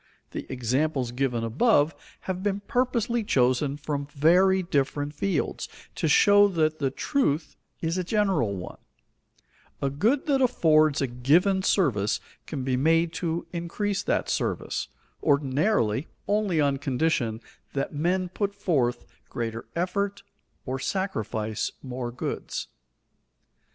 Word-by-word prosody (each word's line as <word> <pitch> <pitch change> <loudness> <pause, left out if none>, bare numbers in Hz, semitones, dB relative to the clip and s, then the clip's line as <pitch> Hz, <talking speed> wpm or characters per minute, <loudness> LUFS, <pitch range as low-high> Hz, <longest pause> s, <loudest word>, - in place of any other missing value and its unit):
The - - -6
examples 130 +1 0
given 125 -2 -1
above 145 - +3 0.3
have 185 -1 -4
been 200 0 -1
purposely 240 0 0
chosen 135 -3 +2
from 145 -1 -3
very 180 +6 +4
different 145 -2 -1
fields, 170 +1 -2 0.2
to - - -1
show 205 +6 +6
that 155 -4 0
the 140 -2 +1
truth 155 - -1 0.3
is 165 +2 -1
a - - 0
general 185 - +1
one: 90 -1 -8 1.0
a 140 - -1
good 225 - +1
that 275 -3 +2
affords 155 - +4
a - - +3
given 155 +11 +3
service 125 - +2 0.3
can 140 -5 -4
be 130 -1 0
made 165 +5 +2
to 170 -1 -1
increase 190 +4 -2
that - - 0
service, - - -2 0.3
ordinarily, 140 - +1 0.2
only 205 -5 +1
on 140 -2 +2
condition 130 -5 0 0.3
that 135 +2 -2
men 180 +5 0
put 200 +2 -3
forth 130 -9 0 0.2
greater 115 -1 -4
effort, 195 +3 -1 0.4
or 130 +1 -3
sacrifice 110 - -2
more 125 -2 -4
goods. 125 - -4
155 Hz, 125 wpm, -26 LUFS, 130-190 Hz, 1.0 s, show